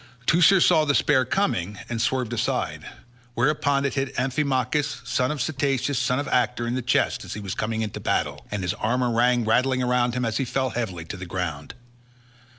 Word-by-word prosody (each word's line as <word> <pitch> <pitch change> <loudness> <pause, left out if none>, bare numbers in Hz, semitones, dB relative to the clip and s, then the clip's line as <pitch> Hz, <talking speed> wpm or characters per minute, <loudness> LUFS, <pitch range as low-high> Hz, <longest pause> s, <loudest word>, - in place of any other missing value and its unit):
Teucer 175 +5 +5
saw 165 -2 +5
the 145 -2 +1
spear 130 -3 +3
coming 105 - -1
and 115 -1 -3
swerved 125 -2 0
aside, 120 - -2 0.5
whereon 140 +2 +1
it 140 - -1
hit 135 -1 -3
Amphimachus, 135 +2 0
son 125 -1 +1
of 150 - -2
Cteatus 135 0 0
son 125 0 +1
of 145 - -2
Actor, 120 -1 +1
in 120 - -2
the 130 - -1
chest 125 - +1
as - - -7
he - - -5
was 100 -3 -4
coming 110 0 -2
into 105 - -5
battle, - - -1
and 105 -2 -3
his 90 - -1
armour 125 +2 0
rang 120 0 +2
rattling 130 +3 +2
round 125 -1 +1
him 125 0 -1
as 110 -1 -1
he - - 0
fell 130 0 -1
heavily 95 -9 -4
to 85 - -7
the 95 0 -7
ground. 85 -6 -4
125 Hz, 195 wpm, -24 LUFS, 110-135 Hz, 0.5 s, Teucer